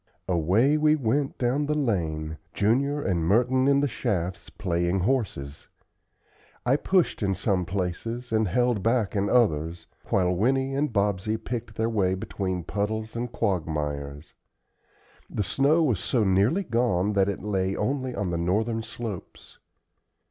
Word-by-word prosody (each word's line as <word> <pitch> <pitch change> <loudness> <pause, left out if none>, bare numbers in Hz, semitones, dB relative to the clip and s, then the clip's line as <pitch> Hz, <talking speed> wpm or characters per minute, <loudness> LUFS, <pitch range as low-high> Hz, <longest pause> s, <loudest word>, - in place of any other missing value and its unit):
Away 95 - +3
we 155 0 +4
went, 135 +1 0
down 130 +4 0
the 150 - 0
lane, 80 - -1 0.2
Junior 140 +8 +1
and 85 -3 0
Merton 125 +8 +3
in 140 0 +4
the 145 - +2
shafts, 95 -6 -3
playing 90 -1 -1
horses. 90 - -2 1.0
I 125 +2 +4
pushed 180 +1 +1
in 95 -2 +1
some 95 -4 0
places, 100 +7 -3
and 110 -1 +2
held 120 +3 +1
back 115 -1 +1
in 100 0 +1
others, 85 -8 +1 0.2
while 90 -1 +2
Winnie 130 +7 +1
and 145 +1 0
Bobsey 105 0 0
picked 115 -1 -5
their 110 0 0
way 95 -5 +1
between 95 -1 -3
puddles 110 +4 -3
and 120 0 -3
quagmires. 75 -7 -2 1.0
The 105 - -1
snow 145 - +3
was 120 - +1
so 120 -4 +1
nearly 100 - +2
gone 115 - +1
that 100 0 +3
it 100 - -4
lay 95 -2 0
only 130 +2 -2
on 100 -3 -2
the 85 - -1
northern 110 +6 0
slopes. 110 -5 -8
105 Hz, 145 wpm, -26 LUFS, 90-125 Hz, 1.0 s, we